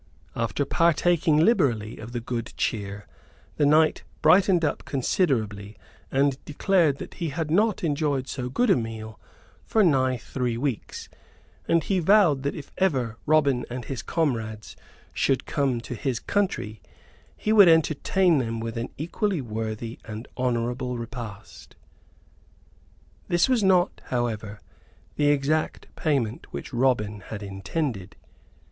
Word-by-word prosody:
After 115 Hz, +4 st, -1 dB
partaking 165 Hz, 0 st, +2 dB
liberally 130 Hz, -, +2 dB
of 110 Hz, +2 st, -8 dB
the 120 Hz, -, -3 dB
good 115 Hz, 0 st, -5 dB
cheer, 100 Hz, -1 st, -2 dB, 0.5 s
the 145 Hz, -, +3 dB
knight 155 Hz, +1 st, +4 dB, 0.2 s
brightened 180 Hz, +1 st, +5 dB
up 150 Hz, -, -2 dB
considerably 110 Hz, -, -1 dB, 0.3 s
and 135 Hz, 0 st, +1 dB
declared 160 Hz, -1 st, +2 dB
that -, -, -8 dB
he 170 Hz, -3 st, -3 dB
had 155 Hz, +1 st, -3 dB
not 210 Hz, +3 st, +2 dB
enjoyed 145 Hz, -4 st, 0 dB
so 125 Hz, -2 st, -4 dB
good 235 Hz, -, +2 dB
a -, -, +6 dB
meal 110 Hz, -3 st, -5 dB, 0.4 s
for 220 Hz, -, +2 dB
nigh 130 Hz, -6 st, +3 dB
three 120 Hz, 0 st, -3 dB
weeks; 130 Hz, -2 st, -4 dB, 0.6 s
and 165 Hz, -2 st, +3 dB
he 190 Hz, +3 st, 0 dB
vowed 175 Hz, -6 st, +4 dB
that 140 Hz, +1 st, -2 dB
if 145 Hz, -3 st, -9 dB
ever 130 Hz, -, +1 dB
Robin 140 Hz, -5 st, +3 dB
and 125 Hz, 0 st, -5 dB
his 135 Hz, -3 st, -4 dB
comrades 115 Hz, -9 st, -2 dB, 0.4 s
should 135 Hz, -, +1 dB
come 135 Hz, -4 st, 0 dB
to 120 Hz, -, -7 dB
his 125 Hz, 0 st, -2 dB
country 190 Hz, -, -2 dB, 0.6 s
he 215 Hz, -, 0 dB
would 205 Hz, -4 st, +8 dB
entertain 160 Hz, +1 st, +3 dB
them 115 Hz, -2 st, -2 dB
with 115 Hz, 0 st, -5 dB
an 120 Hz, -, -4 dB
equally 180 Hz, +4 st, -1 dB
worthy 115 Hz, -1 st, -5 dB
and 110 Hz, +2 st, -8 dB
honorable 125 Hz, 0 st, -1 dB
repast. 115 Hz, -3 st, -9 dB, 1.5 s
This 175 Hz, 0 st, +3 dB
was 250 Hz, -5 st, +2 dB
not, 185 Hz, -1 st, +3 dB
however, 110 Hz, -4 st, -3 dB, 0.5 s
the 145 Hz, -, +2 dB
exact 145 Hz, +2 st, 0 dB
payment 130 Hz, -7 st, -1 dB
which -, -, -7 dB
Robin 120 Hz, -5 st, +1 dB
had 105 Hz, +2 st, -8 dB
intended. 100 Hz, -, -4 dB
135 Hz, 135 wpm, -25 LUFS, 115-160 Hz, 1.5 s, would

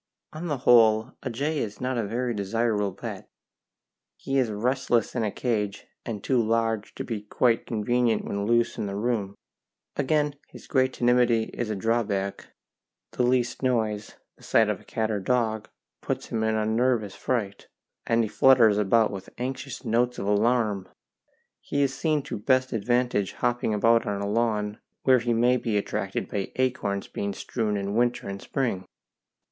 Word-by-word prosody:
On 160 Hz, +3 st, -5 dB
the 145 Hz, -4 st, -1 dB
whole, 115 Hz, -1 st, +5 dB
a -, -, -3 dB
jay 145 Hz, +6 st, -1 dB
is 105 Hz, -2 st, -4 dB
not 130 Hz, +1 st, -1 dB
a 115 Hz, -, 0 dB
very 120 Hz, +4 st, -2 dB
desirable 105 Hz, 0 st, 0 dB
pet; -, -, -8 dB, 0.9 s
he 135 Hz, 0 st, -1 dB
is 125 Hz, -3 st, +1 dB
restless 120 Hz, +1 st, 0 dB
in 120 Hz, -, -1 dB
a 105 Hz, -, +1 dB
cage, 105 Hz, -3 st, -2 dB, 0.2 s
and 110 Hz, -4 st, -4 dB
too 130 Hz, -3 st, +2 dB
large 115 Hz, -1 st, 0 dB
to -, -, -4 dB
be 110 Hz, -4 st, -4 dB
quite 115 Hz, +3 st, +1 dB
convenient 115 Hz, +1 st, +1 dB
when 100 Hz, 0 st, -2 dB
loose 120 Hz, 0 st, +2 dB
in 100 Hz, -, -2 dB
a 100 Hz, -, -4 dB
room; 105 Hz, -2 st, -1 dB, 0.6 s
again, 145 Hz, +1 st, +1 dB
his -, -, -13 dB
great 130 Hz, -2 st, +1 dB
timidity 120 Hz, -2 st, +2 dB
is 120 Hz, -2 st, -3 dB
a 110 Hz, -, -1 dB
drawback 100 Hz, -2 st, -1 dB, 0.6 s
the -, -, -2 dB
least 125 Hz, 0 st, +1 dB
noise, 110 Hz, -5 st, -1 dB, 0.2 s
the -, -, -23 dB
sight -, -, +3 dB
of -, -, -2 dB
a -, -, -18 dB
cat 110 Hz, -1 st, -2 dB
or 105 Hz, -, -1 dB
dog, 110 Hz, 0 st, 0 dB, 0.3 s
puts -, -, -3 dB
him 110 Hz, -, -1 dB
in 110 Hz, 0 st, +1 dB
a 110 Hz, 0 st, 0 dB
nervous 110 Hz, -2 st, +1 dB
fright, 105 Hz, -6 st, -3 dB, 0.4 s
and 115 Hz, 0 st, +3 dB
he -, -, -1 dB
flutters 115 Hz, -3 st, +5 dB
about 110 Hz, +2 st, +3 dB
with 100 Hz, -1 st, -7 dB
anxious 130 Hz, +1 st, -5 dB
notes 120 Hz, +2 st, +1 dB
of -, -, -4 dB
alarm. 105 Hz, -1 st, +1 dB, 0.7 s
He 145 Hz, 0 st, -1 dB
is 135 Hz, -1 st, 0 dB
seen 155 Hz, -2 st, 0 dB
to 135 Hz, -, -5 dB
best 130 Hz, +3 st, +2 dB
advantage 120 Hz, -3 st, 0 dB
hopping 120 Hz, -2 st, 0 dB
about 115 Hz, +2 st, +3 dB
on 100 Hz, -1 st, -1 dB
a 100 Hz, -, -2 dB
lawn, 105 Hz, -1 st, 0 dB, 0.2 s
where 130 Hz, -1 st, +5 dB
he 120 Hz, 0 st, -1 dB
may 120 Hz, +2 st, +3 dB
be 115 Hz, -3 st, -1 dB
attracted 100 Hz, -1 st, -2 dB
by 100 Hz, -2 st, -3 dB
acorns 120 Hz, -6 st, -1 dB
being 100 Hz, 0 st, -3 dB
strewn 110 Hz, -4 st, -2 dB
in 100 Hz, 0 st, -3 dB
winter 120 Hz, 0 st, +1 dB
and 100 Hz, 0 st, -5 dB
spring. 120 Hz, -9 st, -2 dB
115 Hz, 175 wpm, -26 LUFS, 105-125 Hz, 0.9 s, whole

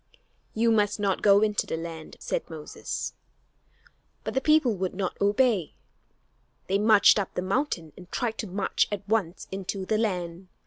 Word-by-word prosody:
"You 230 Hz, +1 st, +3 dB
must 210 Hz, -1 st, +2 dB
not 200 Hz, -2 st, 0 dB
go 200 Hz, 0 st, +6 dB
into 210 Hz, -1 st, +1 dB
the -, -, -2 dB
land," 165 Hz, -1 st, -7 dB
said -, -, -3 dB
Moses. 155 Hz, -2 st, -5 dB, 1.1 s
But -, -, -4 dB
the 265 Hz, -, +1 dB
people 305 Hz, -6 st, +4 dB
would 185 Hz, -1 st, -3 dB
not 185 Hz, -2 st, -2 dB
obey. 205 Hz, -, +2 dB, 0.9 s
They 195 Hz, +1 st, +1 dB
marched 215 Hz, 0 st, +6 dB
up 195 Hz, -, -4 dB
the 180 Hz, -, -1 dB
mountain 190 Hz, -, -1 dB
and 180 Hz, -1 st, -14 dB
tried 230 Hz, -3 st, -2 dB
to 215 Hz, -, -3 dB
march 195 Hz, +2 st, 0 dB
at 205 Hz, -1 st, -4 dB
once 200 Hz, -5 st, -1 dB
into 190 Hz, 0 st, -4 dB
the 215 Hz, +2 st, +1 dB
land. 180 Hz, -4 st, -2 dB
200 Hz, 165 wpm, -27 LUFS, 180-220 Hz, 1.1 s, go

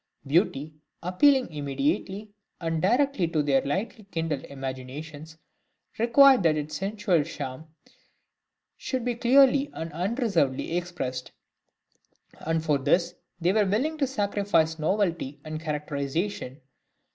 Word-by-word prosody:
Beauty, 150 Hz, -1 st, +1 dB, 0.3 s
appealing 255 Hz, +7 st, +3 dB
immediately 150 Hz, +9 st, -2 dB, 0.3 s
and 165 Hz, -2 st, -2 dB
directly 245 Hz, -, +2 dB
to 160 Hz, -2 st, 0 dB
their 135 Hz, -2 st, +3 dB
lightly 205 Hz, -, -3 dB
kindled 165 Hz, -7 st, -3 dB
imaginations, 140 Hz, +4 st, -7 dB, 0.6 s
required 255 Hz, +2 st, +6 dB
that 160 Hz, -3 st, +3 dB
its 150 Hz, +1 st, -4 dB
sensual 195 Hz, -2 st, +1 dB
charm 130 Hz, +2 st, -7 dB, 1.1 s
should 255 Hz, -3 st, -3 dB
be 245 Hz, -, +1 dB
clearly 270 Hz, +3 st, +4 dB
and 165 Hz, -1 st, -6 dB
unreservedly 180 Hz, -, 0 dB
expressed; 170 Hz, -8 st, -4 dB, 1.1 s
and 160 Hz, 0 st, -1 dB
for 150 Hz, -3 st, +2 dB
this 170 Hz, +5 st, +2 dB, 0.3 s
they 175 Hz, +2 st, +2 dB
were 210 Hz, -2 st, +3 dB
willing 260 Hz, +11 st, 0 dB
to 275 Hz, -, +2 dB
sacrifice 200 Hz, -9 st, 0 dB
novelty 165 Hz, -5 st, -1 dB
and 155 Hz, 0 st, -5 dB
characterisation. 150 Hz, 0 st, -3 dB
165 Hz, 110 wpm, -26 LUFS, 150-210 Hz, 1.1 s, required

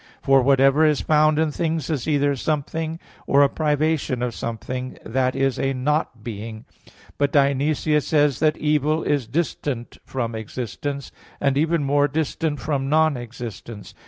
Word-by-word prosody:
For 135 Hz, -1 st, +5 dB
whatever 135 Hz, +3 st, +4 dB
is 150 Hz, -2 st, +3 dB
found 155 Hz, 0 st, +3 dB
in 160 Hz, -1 st, +1 dB
things, 160 Hz, -1 st, -2 dB
is 145 Hz, -4 st, -2 dB
either 145 Hz, -2 st, +2 dB
something, 160 Hz, +3 st, -2 dB, 0.3 s
or 140 Hz, +1 st, +5 dB
a 140 Hz, -, +4 dB
privation 150 Hz, -4 st, 0 dB
of 125 Hz, -1 st, -2 dB
something, 125 Hz, +3 st, -5 dB
that 130 Hz, +2 st, 0 dB
is 135 Hz, -1 st, 0 dB
a 135 Hz, 0 st, 0 dB
"not 130 Hz, -3 st, -1 dB
being." 110 Hz, 0 st, -7 dB, 0.5 s
But 145 Hz, 0 st, +2 dB
Dionysius 145 Hz, +2 st, +2 dB
says 145 Hz, -4 st, +2 dB
(Div. -, -, -18 dB
Nom. 155 Hz, -, +5 dB
iv) 155 Hz, -, +3 dB
that -, -, -8 dB
"evil 150 Hz, +1 st, +2 dB
is 140 Hz, -6 st, 0 dB
distant 140 Hz, -3 st, -3 dB
from 120 Hz, -3 st, -3 dB
existence, 125 Hz, +5 st, -5 dB, 0.3 s
and 140 Hz, -1 st, +1 dB
even 160 Hz, +2 st, +1 dB
more 145 Hz, +1 st, +3 dB
distant 155 Hz, +1 st, -2 dB
from 135 Hz, -3 st, -2 dB
non 155 Hz, 0 st, +3 dB
existence." 115 Hz, -3 st, -8 dB
140 Hz, 160 wpm, -23 LUFS, 130-155 Hz, 0.5 s, For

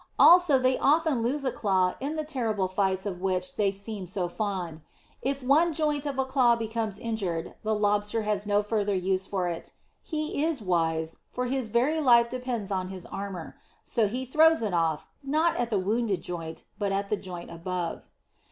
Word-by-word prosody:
Also 350 Hz, -5 st, +7 dB
they 255 Hz, 0 st, +2 dB
often 305 Hz, -3 st, +3 dB
lose 275 Hz, +5 st, -1 dB
a 260 Hz, -, +1 dB
claw 185 Hz, -5 st, +1 dB
in 285 Hz, +4 st, -3 dB
the 310 Hz, -, -2 dB
terrible 230 Hz, -10 st, -1 dB
fights 190 Hz, 0 st, 0 dB
of 185 Hz, -3 st, -4 dB
which 185 Hz, -1 st, -1 dB
they 200 Hz, -2 st, +2 dB
seem 200 Hz, -1 st, -6 dB
so 180 Hz, 0 st, -2 dB
fond. 175 Hz, -4 st, -3 dB, 0.4 s
If 275 Hz, 0 st, -2 dB
one 310 Hz, +6 st, +4 dB
joint 295 Hz, -2 st, 0 dB
of 275 Hz, -2 st, -3 dB
a 265 Hz, -, +1 dB
claw 260 Hz, -3 st, +4 dB
becomes 225 Hz, -2 st, -3 dB
injured 195 Hz, -8 st, -3 dB
the 215 Hz, 0 st, 0 dB
Lobster 210 Hz, +1 st, +1 dB
has 210 Hz, -1 st, -1 dB
no 205 Hz, 0 st, +3 dB
further 210 Hz, -1 st, 0 dB
use 190 Hz, +1 st, 0 dB
for 185 Hz, -3 st, -1 dB
it; 170 Hz, -1 st, -5 dB, 0.3 s
he 310 Hz, -2 st, -2 dB
is 320 Hz, -3 st, 0 dB
wise, 165 Hz, -4 st, 0 dB
for 250 Hz, -, -2 dB
his 255 Hz, -2 st, -2 dB
very 255 Hz, +8 st, +2 dB
life 235 Hz, -5 st, +5 dB
depends 250 Hz, -5 st, -3 dB
on 185 Hz, -1 st, -1 dB
his 185 Hz, -2 st, -8 dB
armour. 195 Hz, -4 st, -6 dB, 0.3 s
So 225 Hz, -4 st, +1 dB
he 250 Hz, +5 st, -3 dB
throws 315 Hz, +1 st, +4 dB
it 205 Hz, -4 st, -1 dB
away, 165 Hz, -2 st, +2 dB, 0.2 s
not 310 Hz, +4 st, +1 dB
at 240 Hz, -1 st, 0 dB
the 215 Hz, -, +1 dB
wounded 205 Hz, -1 st, 0 dB
joint, 165 Hz, -2 st, -6 dB, 0.2 s
but 200 Hz, -2 st, 0 dB
at 200 Hz, 0 st, -1 dB
the -, -, +2 dB
joint 180 Hz, -3 st, -8 dB
above. 170 Hz, 0 st, -4 dB
210 Hz, 190 wpm, -27 LUFS, 185-260 Hz, 0.4 s, Also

